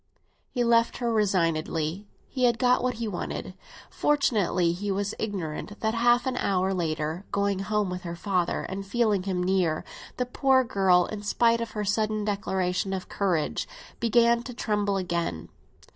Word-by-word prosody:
He 245 - -1
left 230 0 +3
her 235 -2 -1
resignedly; 170 -3 0 0.2
he 255 -2 0
had 240 -1 +3
got 250 0 +3
what 250 -1 0
he 230 0 -3
wanted. 195 -4 -4 0.4
Fortunately 205 -12 +2
he 200 +4 -4
was 200 +1 -1
ignorant 200 -1 -4
that 220 0 +1
half 240 +1 +3
an 260 -1 -1
hour 190 -2 +1
later, 160 0 -2
going 200 -1 0
home 205 -1 -1
with 180 0 -4
her 170 -1 -5
father 180 -1 -1
and 195 +1 -5
feeling 210 -1 +1
him 185 -1 -2
near, 180 -4 +1 0.3
the 250 - 0
poor 260 +1 +3
girl, 190 -6 +3
in 215 +2 -6
spite 230 +3 +2
of 230 - -5
her 210 - -1
sudden 215 +1 0
declaration 190 -2 -1
of 190 -1 -5
courage, 180 -6 -1 0.3
began 235 0 +4
to 245 0 -8
tremble 205 -3 0
again. 170 - -2
200 Hz, 160 wpm, -27 LUFS, 180-230 Hz, 0.4 s, began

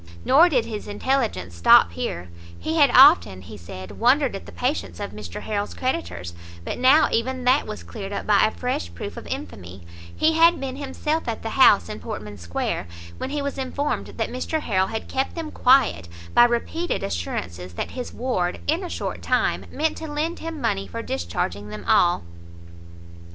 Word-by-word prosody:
Nor 330 +6 +6
did 255 -8 +1
his 215 -2 -6
intelligence 210 - -1
stop 85 0 +6
here; 85 +1 -5 0.3
he 320 +1 -3
had 290 -3 +6
often, 255 - +6
he - - -10
said, 95 +2 -9
wondered 260 +1 +3
at 195 - -8
the - - -9
patience 260 -1 -2
of 205 - -5
Mr 105 -5 -8
Harrel's 205 -1 -3
creditors, 90 - -3 0.3
but - - -4
now 265 +5 +6
even 255 +2 -1
that 255 +3 +3
was 215 - -6
cleared 200 -3 -7
up 200 - -4
by 210 -1 +4
a - - +4
fresh 220 - -3
proof - - -6
of - - -9
infamy; 90 -1 -7 0.3
he 320 +1 +3
had 335 +1 +5
been 270 -1 -5
himself 295 +3 -2
at 230 - -3
the 225 - -4
house 155 - +5
in 105 - -6
Portmansquare, 100 -7 -4 0.3
where - - -3
he 290 0 -2
was 280 -1 -4
informed 280 +2 -2
that - - -2
Mr 305 +5 -2
Harrel 190 -6 +1
had 220 0 -5
kept 265 +1 -2
them 325 -2 -5
quiet, 250 - +3 0.3
by 240 - +7
repeated 280 +9 -1
assurances 90 0 -4
that - - -4
his 250 -1 -6
ward, 185 -9 -2
in 325 +5 0
a 360 - -5
short - - -4
time, - - 0
meant 315 +1 -1
to 320 -2 -6
lend 310 +3 -2
him 325 -1 -6
money 100 - -1
for 85 - -6
discharging 90 +3 -3
them 105 -2 -8
all. 175 - +4
230 Hz, 180 wpm, -23 LUFS, -, 0.3 s, by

